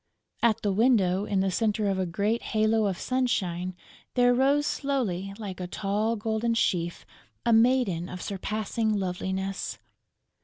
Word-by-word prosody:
At 230 -3 +2
the 205 - +2
window, 200 -4 +3
in 195 -2 +1
the 190 0 +1
center 215 +1 0
of 195 -1 0
a 185 - 0
great 205 +7 0 0.2
halo 215 0 +3
of 190 -3 -2
sunshine, 185 -9 -1 0.4
there 245 -1 +5
rose 275 +3 +3
slowly, 220 -12 -1
like 200 -5 -6
a 180 - -4
tall 210 +5 -1
golden 225 +2 -1
sheaf, 175 -6 0 0.4
a 235 - +4
maiden 225 -7 +3
of 180 - -6
surpassing 215 +3 -2
loveliness! 190 0 -3
210 Hz, 145 wpm, -27 LUFS, 190-230 Hz, 0.4 s, there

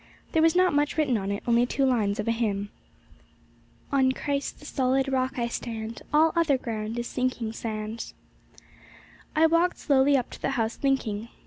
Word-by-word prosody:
There 320 - +2
was 325 +1 +4
not 365 -2 +4
much 290 +1 +1
written 290 -6 +2
on 195 -1 -3
it, 200 - -4
only 240 +1 +3
two 275 +2 +1
lines 215 -6 +1
of 210 - -2
a - - +3
hymn: 205 -3 -1 1.2
'On 265 -2 +3
Christ, 280 0 -3
the 295 - -14
solid 265 -1 +1
Rock, 260 -1 -1
I 235 -1 0
stand, 225 -1 -5
All 315 +2 +4
other 325 -5 +3
ground 225 -2 -4
is 240 - -2
sinking 250 -3 -2
sand.' 220 0 -5 1.2
I 315 +1 +5
walked 335 +2 +2
slowly 280 0 +3
up 250 - -3
to - - -10
the - - 0
house 225 0 0
thinking. 235 -6 -1
255 Hz, 180 wpm, -26 LUFS, 225-285 Hz, 1.2 s, I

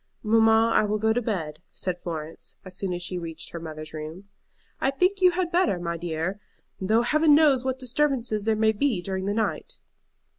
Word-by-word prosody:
"Mamma, 225 +1 +4
I - - +4
will 210 0 0
go 220 +1 +2
to 245 - 0
bed," 165 -10 -3
said 180 -1 -4
Florence, 160 -2 -6
as 185 -1 -8
soon 195 0 -2
as 175 0 -3
she 180 0 -3
reached 165 -2 -6
her 170 - -6
mother's 155 -1 -8
room. 160 +6 -8 0.5
"I 270 - +2
think 365 +8 +1
you 365 - +7
had 355 -1 -1
better, 350 - +2
my 170 -1 -3
dear, 170 +3 -3 0.4
though 220 +5 +2
Heaven 305 +3 +4
knows 290 -5 +4
what 260 0 -1
disturbances 255 -4 0
there 220 -1 +2
may 220 0 +3
be 220 -4 0
during 190 0 -3
the 205 +1 -1
night." 220 - -2
215 Hz, 195 wpm, -26 LUFS, 175-255 Hz, 0.5 s, you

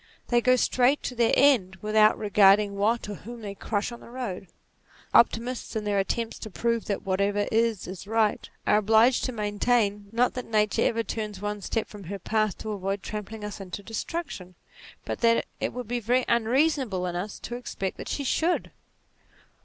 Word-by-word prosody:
They 240 -1 +3
go 255 +1 +4
straight 255 +3 +2
to 250 - -4
their 235 -1 +3
end, 245 -10 +4
without 215 +2 +3
regarding 205 0 +4
what 215 +4 +1
or 205 - -4
whom 230 +4 -9
they 200 -1 -5
crush 205 +3 -2
on 235 - -9
the - - -14
road. 235 -7 -5 0.7
Optimists, 235 +1 +2
in 220 - -1
their 205 -1 +1
attempts 225 +4 -2
to 220 - -7
prove 230 +3 -1
that 200 - -2
"whatever 200 +2 +1
is, 225 -2 +1
is 185 +1 -8
right," 220 -1 +1 0.2
are 210 - +4
obliged 220 +4 +4
to 255 - -2
maintain, 210 -1 0
not 240 +2 +2
that 250 - -5
Nature 210 -2 +2
ever 230 0 0
turns 210 -2 -4
one 205 0 -4
step 220 +3 -2
from 205 -3 -11
her 200 +4 -5
path 215 +2 0
to 220 - -5
avoid 195 0 -3
trampling 210 +1 -6
us 210 0 -6
into 195 +1 -7
destruction, 225 - -5 0.5
but - - -4
that 230 -1 +3
it - - -1
would 250 -2 -6
be 245 +1 -1
very 245 +3 +1
unreasonable 235 - +1
in 175 -1 -3
us 195 +4 -4
to 240 - -6
expect 195 -6 -4
that - - -7
she 285 - -2
should. 330 +6 0
215 Hz, 185 wpm, -26 LUFS, 200-235 Hz, 0.7 s, go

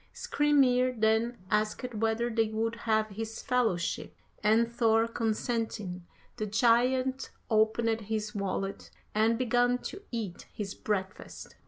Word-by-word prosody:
Skrymir 255 -4 +2
then 220 +2 +2
asked 215 +4 0
whether 225 +2 0
they 225 -1 +2
would 225 +1 -1 0.2
have 215 0 +2
his 220 +2 -6
fellowship, 230 -10 0 0.3
and 220 +2 +4
Thor 225 -1 +3
consenting, 220 -5 -2 0.3
the 215 -2 -2
giant 250 +4 +2 0.2
opened 220 +1 +2
his 215 0 -3
wallet 195 -1 -3 0.2
and 220 +2 +3
began 245 0 +2
to 390 - -6
eat 215 -7 -5
his 200 -2 -5
breakfast. 195 -2 -4
225 Hz, 120 wpm, -30 LUFS, 215-240 Hz, 0.3 s, and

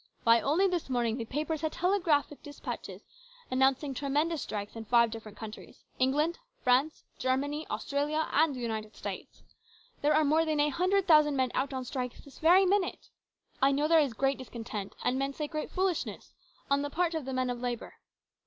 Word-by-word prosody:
Why, 230 0 +5
only 330 +8 +3
this 355 -6 -2
morning 240 -2 0
the 230 - -4
papers 300 +5 -2
had 315 -1 -1
telegraphic 340 -6 +1
dispatches 290 0 -7 0.5
announcing 265 +2 +2
tremendous 295 +4 0
strikes 205 0 -5
in 225 -1 -7
five 235 0 +4
different 220 -2 -9
countries, 220 -1 -10 0.2
England, 295 - +1 0.2
France, 265 +5 +2 0.2
Germany, 285 +4 -1
Australia, 295 +2 -1
and 300 -1 +3
the 250 - -6
United 220 -2 -4
States. - - -7 0.6
There 295 +1 +3
are 310 0 +4
more 310 +3 +3
than 310 -2 0
a 295 +1 +3
hundred 365 +6 +1
thousand 305 -3 +6
men 260 -2 +1
out 270 +2 0
on 260 -1 -4
strikes 250 -1 -4
this 280 - -15
very 360 +4 +6
minute. 385 0 0 0.5
I 270 +1 +5
know 290 +2 +1
there 330 0 +6
is 280 -6 +1
great 270 +4 0
discontent, 225 -5 -6
and 260 +1 +1
men 275 0 -1
say 300 - -3
great 305 0 -4
foolishness, 370 -2 -2 0.3
on 280 0 +2
the 290 - -2
part 345 +3 0
of 315 -4 -3
the 265 - -4
men 255 -1 0
of 245 - -5
labour. 245 -2 -4
280 Hz, 185 wpm, -30 LUFS, 250-315 Hz, 0.6 s, thousand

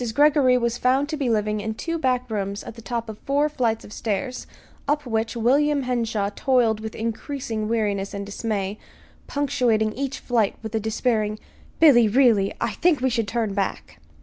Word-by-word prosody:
Greggory 285 -3 +5
was 235 -1 -1
found 265 +3 +2
to 310 - -2
be 280 -5 -1
living 215 -1 0
in 220 +1 -3
two 330 +7 -3
back 255 -2 0
rooms 200 -1 -3
at - - -8
the 230 - -12
top 230 0 -3
of 215 -1 -8
four 285 +2 +1
flights 235 -7 -1
of 205 - -11
stairs, 245 +4 -3 0.4
up 295 0 0
which 225 -1 -1
William 280 +5 +2
Henshaw 230 -5 -1
toiled 240 -5 +2
with 220 0 -6
increasing 225 -1 -3
weariness 205 -3 -1
and 200 -1 -5
dismay, 205 -1 -3 0.5
punctuating 250 -7 +1
each 275 +2 -3
flight 230 -5 0
with 220 0 -6
a 220 - +1
despairing: 215 -1 0 0.4
"Billy, 255 -8 +7
really, 220 -4 +4
I - - 0
think 335 -4 +2
we 260 0 +1
should 230 -3 0
turn 225 -2 -1
back!" 195 - -3
230 Hz, 175 wpm, -23 LUFS, 215-265 Hz, 0.5 s, Billy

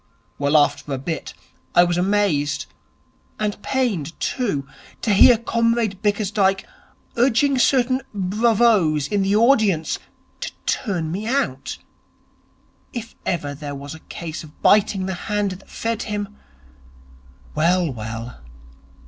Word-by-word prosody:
Well, 145 +2 +3
after 145 0 +1
a 135 - -1
bit, 155 +3 -5 0.4
I 175 - +8
was 175 0 +1
amazed, 180 -6 +1 0.7
and 210 -1 -2
pained, 205 - -1
too, 195 - -1 0.4
to 210 - +2
hear 230 +4 +8
Comrade 230 -3 0
Bickersdyke 205 -2 +1 0.5
urging 260 +2 +3
certain 255 +1 +3
bravoes 205 -6 +2
in 205 -1 0
the 195 +1 +2
audience 215 - +3 0.4
to - - -4
turn 175 -10 -1
me 205 +5 -3
out. 275 +3 -1 1.2
If 230 -2 -6
ever 145 -5 -1
there 145 0 -6
was 140 +1 -7
a 160 - -10
case 160 0 -7
of 150 -1 -15
biting 200 -2 +4
the 190 - -2 0.2
hand 205 -1 0
that 185 +1 -10
fed 230 0 -3
him.... 205 -2 -4 1.2
Well, 170 +1 +2
well.... 115 - -7
195 Hz, 125 wpm, -22 LUFS, 160-225 Hz, 1.2 s, I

